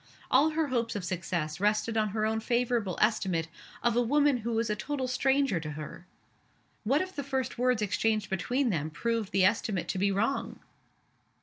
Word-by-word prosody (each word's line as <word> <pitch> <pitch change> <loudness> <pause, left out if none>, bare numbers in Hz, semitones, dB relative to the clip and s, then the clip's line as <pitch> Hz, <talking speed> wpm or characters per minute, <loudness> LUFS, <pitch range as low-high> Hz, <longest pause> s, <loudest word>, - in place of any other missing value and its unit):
All 280 +5 +5
her 315 -1 -1
hopes 235 -3 -1
of 200 -3 -3
success 175 -3 -3
rested 210 +2 +1
on 215 -1 +2
her 215 +1 -1
own 220 0 0
favorable 235 -5 0
estimate 185 -6 +1 0.4
of 235 -1 +2
a 245 - +4
woman 285 +2 +3
who 235 0 -3
was 225 0 +1
a 210 - 0
total 265 +4 -3
stranger 265 -4 +2
to 155 -1 -6
her! 155 +4 -8 0.8
What 270 +7 +2
if 375 0 -9
the 285 - -3
first 265 -3 -3
words 250 -3 +2
exchanged 215 +1 0
between 245 +7 0
them 155 -4 -1
proved 225 +5 -2
the 195 -2 +4
estimate 205 -2 0
to 185 - -1
be 200 +1 +2
wrong? 225 +8 -1
225 Hz, 185 wpm, -29 LUFS, 195-255 Hz, 0.8 s, All